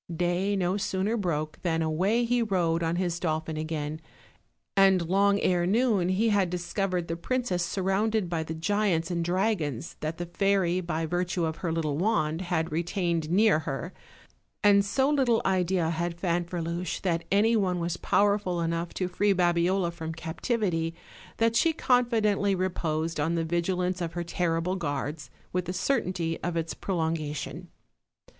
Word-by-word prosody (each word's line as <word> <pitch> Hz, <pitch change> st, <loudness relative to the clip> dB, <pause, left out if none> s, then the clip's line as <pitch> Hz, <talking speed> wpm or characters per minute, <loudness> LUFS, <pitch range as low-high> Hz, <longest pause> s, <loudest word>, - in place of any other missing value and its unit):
Day 180 Hz, +4 st, 0 dB
no 185 Hz, 0 st, 0 dB
sooner 195 Hz, +2 st, -1 dB
broke 155 Hz, -7 st, -2 dB
than 165 Hz, -3 st, 0 dB
away 190 Hz, +10 st, +1 dB
he 245 Hz, +1 st, +1 dB
rode 175 Hz, -6 st, +1 dB
on 165 Hz, 0 st, 0 dB
his 175 Hz, -1 st, -1 dB
dolphin 160 Hz, -2 st, -2 dB
again, 155 Hz, 0 st, -3 dB, 0.7 s
and 190 Hz, -3 st, +4 dB
long 200 Hz, +2 st, +3 dB
ere 175 Hz, -1 st, +2 dB
noon 210 Hz, -4 st, +2 dB
he 210 Hz, +5 st, +2 dB
had 200 Hz, -4 st, +2 dB
discovered 180 Hz, 0 st, -2 dB
the 165 Hz, -, -2 dB
princess 185 Hz, -1 st, -1 dB
surrounded 195 Hz, +3 st, 0 dB
by 170 Hz, -2 st, -1 dB
the 160 Hz, 0 st, -5 dB
giants 180 Hz, -1 st, 0 dB
and 170 Hz, -1 st, 0 dB
dragons 175 Hz, -, -1 dB
that 155 Hz, +1 st, -3 dB
the 175 Hz, -, -3 dB
fairy, 185 Hz, 0 st, +1 dB
by 165 Hz, -2 st, -2 dB
virtue 175 Hz, +1 st, -1 dB
of 160 Hz, 0 st, -3 dB
her 170 Hz, -, -2 dB
little 155 Hz, -3 st, -1 dB
wand, 170 Hz, -5 st, +1 dB
had 175 Hz, -2 st, -1 dB
retained 170 Hz, -1 st, -1 dB
near 200 Hz, -1 st, +4 dB
her; 160 Hz, +3 st, -5 dB, 0.7 s
and 200 Hz, -1 st, +6 dB
so 235 Hz, +7 st, +1 dB
little 265 Hz, -6 st, +3 dB
idea 180 Hz, -3 st, +1 dB
had 170 Hz, +1 st, -3 dB
Fanferluche 175 Hz, -1 st, -2 dB
that 170 Hz, -3 st, 0 dB
any 215 Hz, +4 st, +4 dB
one 185 Hz, -4 st, +1 dB
was 170 Hz, 0 st, -2 dB
powerful 200 Hz, -3 st, +1 dB
enough 170 Hz, +1 st, -2 dB
to 185 Hz, -, -1 dB
free 200 Hz, +3 st, +2 dB
Babiola 175 Hz, 0 st, +2 dB
from 160 Hz, -1 st, -6 dB
captivity 165 Hz, 0 st, -1 dB, 0.4 s
that 230 Hz, 0 st, +2 dB
she 325 Hz, +7 st, +3 dB
confi 245 Hz, -6 st, +2 dB
dently 200 Hz, -2 st, +2 dB
reposed 165 Hz, -3 st, -1 dB
on 160 Hz, +3 st, +1 dB
the 165 Hz, -1 st, 0 dB
vigilance 180 Hz, +2 st, -1 dB
of 170 Hz, -1 st, -3 dB
her 175 Hz, -, -2 dB
terrible 170 Hz, +1 st, -1 dB
guards, 145 Hz, -1 st, -3 dB, 0.2 s
with 180 Hz, 0 st, 0 dB
the 180 Hz, -, -3 dB
certainty 185 Hz, -6 st, -1 dB
of 175 Hz, -1 st, -2 dB
its 165 Hz, 0 st, -2 dB
prolongation. 160 Hz, -2 st, -3 dB
175 Hz, 160 wpm, -28 LUFS, 165-195 Hz, 0.7 s, and